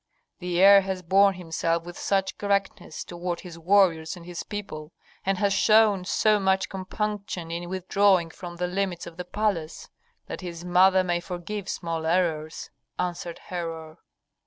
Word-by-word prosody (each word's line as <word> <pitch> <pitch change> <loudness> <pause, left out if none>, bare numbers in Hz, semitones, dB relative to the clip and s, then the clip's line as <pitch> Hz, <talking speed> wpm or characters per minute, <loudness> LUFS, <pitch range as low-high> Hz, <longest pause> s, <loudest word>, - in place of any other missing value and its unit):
"The 180 -1 -2
heir 200 +1 +8
has 190 -1 -4
borne 195 +3 +4
himself 165 -1 -1
with 175 0 -9
such 195 -1 -1
correctness 200 -1 -2
toward 175 0 -5
his 170 -2 -10
warriors 170 -2 +3
and 170 - -12
his 175 -1 -6
people, 175 -7 -7 0.3
and 195 0 0
has 200 0 +2
shown 215 -3 +4
so 215 +2 +3
much 190 -1 +1
compunction 195 -2 -4
in 175 +1 -4
withdrawing 185 -1 +2
from 175 0 -9
the 180 +1 -2
limits 180 -1 -2
of 170 -1 -11
the 180 - -5
palace, 185 -6 -2 0.4
that - - -7
his 175 -1 -7
mother 185 +1 +5
may 175 -1 0
forgive 185 +3 -6
small 165 -2 -3
errors," 160 -3 -1 0.3
answered 175 -1 -3
Herhor. 165 -2 -5
180 Hz, 155 wpm, -26 LUFS, 170-195 Hz, 0.4 s, heir